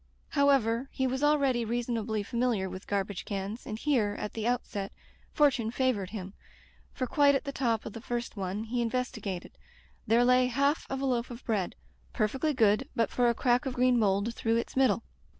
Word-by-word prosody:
However, 270 -3 +2
he 265 - -1
was 260 +1 -1
already 280 -5 +3
reasonably 230 -2 -2
fa 220 - -9
miliar 235 -6 +1
with 185 +1 -8
garbage 200 -1 -2
cans, 200 +3 -5
and 215 - -4
here, 225 -7 +1
at 210 - -5
the 225 0 -2
outset, 210 -5 -2 0.4
fortune 260 -7 +3
favored 235 -6 0
him; 195 -2 -7 0.6
for 255 - -2
quite 285 +2 +4
at 275 - 0
the 280 - -4
top 235 -5 0
of - - -6
the 230 - -8
first 240 -1 -4
one 195 +1 -3
he 240 +2 -2
investigated, 230 -6 -3 0.6
there 235 +3 +4
lay 250 0 +5
half 280 +5 +1
of 270 0 -3
a - - 0
loaf 245 -2 0
of 240 0 -9
bread, 205 -6 -1 0.4
perfectly 265 +7 0
good 235 +1 +2
but 230 -2 +1
for 245 -1 +3
a 235 - +1
crack 250 +3 +2
of 255 - -3
green 250 -1 +3
mould 200 +2 +1
through 225 0 0
its 235 - -3
middle. 260 -3 +3
235 Hz, 190 wpm, -29 LUFS, 215-260 Hz, 0.6 s, lay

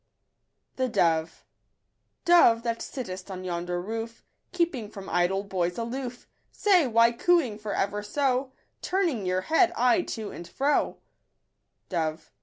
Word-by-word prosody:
117 165 -11 +1 0.5
" - - -50
Dove, 335 -10 +6
that 230 -1 -2
sittest 190 -7 -6
on 185 -1 -6
yonder 175 0 -3
roof, 225 +4 -5 0.3
Keeping 335 - -1
from 195 -3 -9
idle 180 +3 +1
boys 180 -3 -2
aloof; 245 +1 -5 0.3
Say, 370 -8 +3
why 230 0 +5
cooing 250 -4 +2
for 210 -1 -4
ever 205 +1 -1
so, 260 +4 0 0.3
Turning 335 - 0
your 185 0 +1
head 325 - +3
aye 250 +8 +3
to 220 -10 -5
and 170 - -9
fro 285 +2 +1
V* - - -29 0.9
Dove 160 -3 -3
230 Hz, 135 wpm, -27 LUFS, 185-265 Hz, 0.9 s, Dove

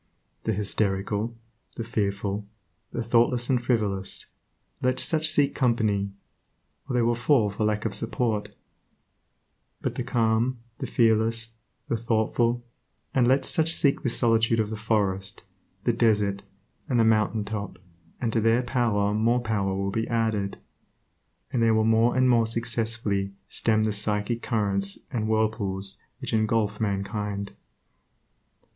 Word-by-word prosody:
The 110 - +1
hysterical, 105 +2 -1 0.4
the 115 - -4
fearful, 100 -2 -2 0.4
the 120 - -3
thoughtless 120 +2 +2
and 125 -2 +1
frivolous, 105 -6 0 0.6
let 130 0 +1
such 155 -1 +3
seek 145 -2 +3
company, 110 -5 +1 0.8
or 125 - -1
they 120 - +3
will 120 +1 +2
fall 120 -3 +2
for 105 +2 -2
lack 105 0 0
of - - -1
support; 115 -2 -1 1.3
but - - -2
the - - -4
calm, 115 +2 +1 0.2
the - - -3
fearless, 115 0 +2 0.3
the 115 - 0
thoughtful, 115 +1 0 0.5
and 125 -2 +3
let 135 +2 +3
such 160 0 +4
seek 140 -2 +2
the 125 - 0
solitude 115 -1 +3
of 110 -1 0
the - - -2
forest, 100 -3 -1 0.4
the - - +2
desert, 105 -3 +2 0.5
and 125 -3 +2
the - - +5
mountain 110 -1 +2
top, 105 -1 -5 0.4
and 115 -3 -1
to 115 - +2
their 115 +3 +3
power 110 -4 +1
more 115 +3 +2
power 100 -4 -1
will 100 0 -2
be 115 +2 -1
added, 110 -4 -1 1.0
and 120 - +1
they 115 - +4
will 110 0 +3
more 115 +2 +3
and 130 0 +4
more 115 -2 +4
successfully 110 -4 -2
stem 110 -1 +1
the 110 -1 0
psychic 105 +2 -1
currents 100 -3 0
and 110 -3 -1
whirlpools 105 -3 0 0.2
which - - -5
engulf 110 -1 +1
mankind. 100 0 -2
110 Hz, 140 wpm, -26 LUFS, 105-120 Hz, 1.3 s, the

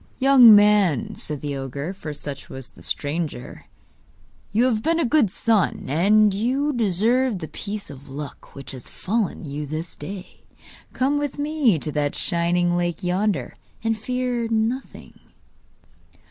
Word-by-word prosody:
'Young 260 -5 +8
man,' 210 0 +4
said 150 -7 -6
the 145 -1 -3
ogre 140 +5 -4
(for 175 -6 -7
such 145 -1 -7
was 130 -1 -8
the - - -17
stranger), 150 -3 -3 0.9
'you 230 +4 +3
have 225 -4 +1
been 330 +6 +1
a 330 - +2
good 250 -4 +3
son, 215 -1 +1
and 205 +7 +4
you 260 +8 0
deserve 230 +2 +1
the 160 -3 -6
piece 205 +1 -6
of 140 0 -13
luck 140 +1 -9
which 135 -2 -8
has 130 -3 -10
befallen 205 -3 -2
you 145 +1 -5
this 155 +3 -5
day. 185 +5 -9 0.5
Come 280 +3 +1
with 290 -1 -3
me 290 - +2
to 150 +1 -4
that 145 -1 -1
shining 175 0 +1
lake 175 +2 -2
yonder, 180 - -1 0.3
and 225 0 +1
fear 250 +1 -2
nothing. 225 +4 -3
200 Hz, 145 wpm, -23 LUFS, 155-235 Hz, 0.9 s, Young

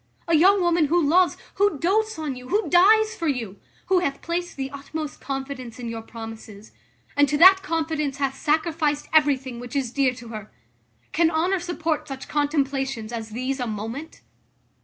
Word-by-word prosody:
A 335 - +3
young 380 +5 +5
woman, 345 -2 +3
who 335 +4 +2
loves, 345 +3 +3 0.2
who 405 -5 +2
doats 430 +6 +1
on 305 -4 -3
you, 250 0 -10
who 415 +3 +1
dies 435 +5 +5
for 335 - -3
you; 230 -9 -2 0.3
who 375 -1 +3
hath 280 -6 -3
placed 345 0 -3
the 270 -1 -4
utmost 290 +2 -6
confidence 270 -4 -5
in 240 -2 -5
your 225 0 -5
promises; 225 -2 -10 0.4
and 285 -1 +4
to 295 - +1
that 380 +4 +8
confidence 320 -5 -2
hath 275 -1 -1
sacrificed 305 0 0
everything 270 -5 +2
which 245 +3 -8
is 265 -4 -1
dear 265 -1 +1
to 240 -2 -11
her? 215 -2 -8 0.6
Can 330 0 +3
honour 345 +4 +1
support 330 -3 -2
such 270 -2 -7
contemplations 270 -6 -1
as 225 -1 -5
these 255 +5 -3
a 245 - -2
moment?" 225 +9 -6
290 Hz, 175 wpm, -24 LUFS, 255-335 Hz, 0.6 s, that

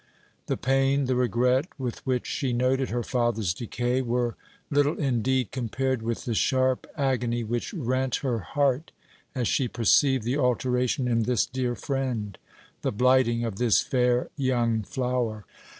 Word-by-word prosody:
The - - -1
pain, 135 +2 +2
the 130 0 0
regret, 125 +3 +2
with 125 -4 -5
which 125 -2 0
she 135 -4 -2
noted 130 +2 +1
her 120 0 -1
father's 115 -8 0
decay 120 +5 -1
were 120 -1 -1 0.4
little 145 +1 +2
indeed 130 -3 0
compared 130 0 -1
with 115 0 -3
the 120 - -1
sharp 130 +3 +1
agony 125 -4 0
which 120 +2 -3
rent 130 -3 0
her 120 -3 0
heart 140 - 0 0.4
as 125 -3 0
she 130 - +1
perceived 130 +3 +3
the 125 +6 -1
alteration 125 0 +1
in 115 -1 +2
this 120 +1 +1
dear 125 -1 -2
friend, 125 -7 -3 0.4
the - - 0
blighting 125 0 +3
of 110 -4 -4
this 120 -2 +3
fair 125 -1 +1
young 120 -5 +1
flower. 120 -2 -2
125 Hz, 150 wpm, -26 LUFS, 120-130 Hz, 0.4 s, perceived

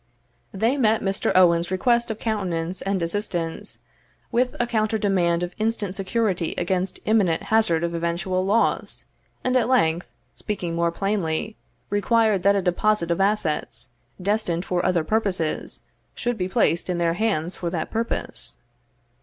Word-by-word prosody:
They 225 +8 +1
met 220 -4 +3
Mr. 195 0 0
Owen's 175 -2 +5
request 235 +6 +2
of 220 - -3
countenance 185 -6 -2
and 195 -3 -1
assistance 170 -2 -3 0.5
with 250 +1 +1
a 240 - +2
counter 220 -1 0
demand 180 -4 +1
of 175 0 -4
instant 215 -3 -1
security 195 -3 -1
against 185 +1 -1
imminent 200 -7 +2
hazard 205 -7 +3
of 170 0 -1
eventual 170 +2 -1
loss; 210 +4 0 0.4
and 255 0 +1
at 250 -3 +3
length, 175 -10 +2 0.3
speaking 180 -5 -4
more 170 0 +1
plainly, 195 +1 -1 0.4
required 215 -1 +2
that 200 +2 +4
a 195 - 0
deposit 180 0 +1
of 170 - +1
assets, 180 - -1 0.3
destined 185 -3 -1
for 180 -1 -1
other 180 -3 +2
purposes, 185 -4 -1 0.3
should 245 0 -1
be 185 -3 -2
placed 185 -5 +1
in 180 - 0
their 170 -1 +1
hands 185 -4 -1
for 175 - -2
that 165 -2 -3
purpose. 230 +1 -3
190 Hz, 145 wpm, -24 LUFS, 170-215 Hz, 0.5 s, Owen's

